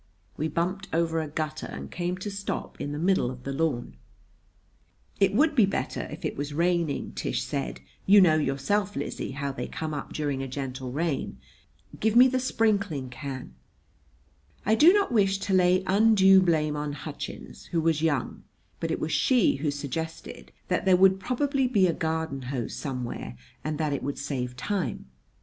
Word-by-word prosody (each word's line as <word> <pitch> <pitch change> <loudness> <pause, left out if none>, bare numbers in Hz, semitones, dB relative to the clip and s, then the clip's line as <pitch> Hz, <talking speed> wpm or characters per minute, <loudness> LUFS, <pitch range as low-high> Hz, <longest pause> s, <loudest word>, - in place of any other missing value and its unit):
We 155 - -1
bumped 180 +5 -2
over 165 0 +1
a 155 - -4
gutter 155 +1 -4
and - - -8
came 175 +1 -2
to 185 +3 -5
a - - -7
stop 200 0 -5
in 145 - -3
the 145 - -4
middle 180 -5 +2
of 125 -1 -8
the 135 - -4
lawn. 135 - -2 1.2
"It 195 -1 +4
would 305 +6 +4
be 230 -8 +5
better 195 - -3
if - - -7
it - - -2
was 145 +1 -4
raining," 170 -2 0
Tish - - -2
said. 60 - -4 0.3
"You 200 +2 +8
know, 175 -5 +6
yourself, 155 +8 0
Lizzie, 140 - -4
how 140 0 -3
they 135 - -5
come 155 -1 -4
up 145 - -5
during 145 -3 -2
a 135 - -3
gentle 130 -1 -5
rain. 145 - -2 0.6
Give 220 +1 +1
me 250 +2 +9
the 260 0 0
sprinkling 200 - 0
can." 130 - -7 1.1
I 215 - +3
do 305 +10 +7
not 405 -5 +2
wish 195 -4 +3
to 195 0 -2
lay 185 0 +4
undue 195 -1 +6
blame 155 -4 +1
on 150 0 -3
Hutchins, 65 - -8
who 170 - -1
was 160 -1 +1
young; 145 -6 -1 0.4
but 165 - -2
it 160 - -1
was 155 - -2
she 245 - +3
who 145 +2 -1
suggested 145 +3 -5 0.2
that - - 0
there 185 -1 +5
would 190 +1 +5
probably 270 +5 0
be 210 -7 +3
a 170 - +2
garden 160 -4 -2
hose 125 -4 -3
somewhere 125 - -5 0.3
and 155 -1 -2
that 155 -2 0
it 140 - -2
would 140 +1 -3
save 125 -3 -4
time. 135 - -3
160 Hz, 180 wpm, -27 LUFS, 140-195 Hz, 1.2 s, me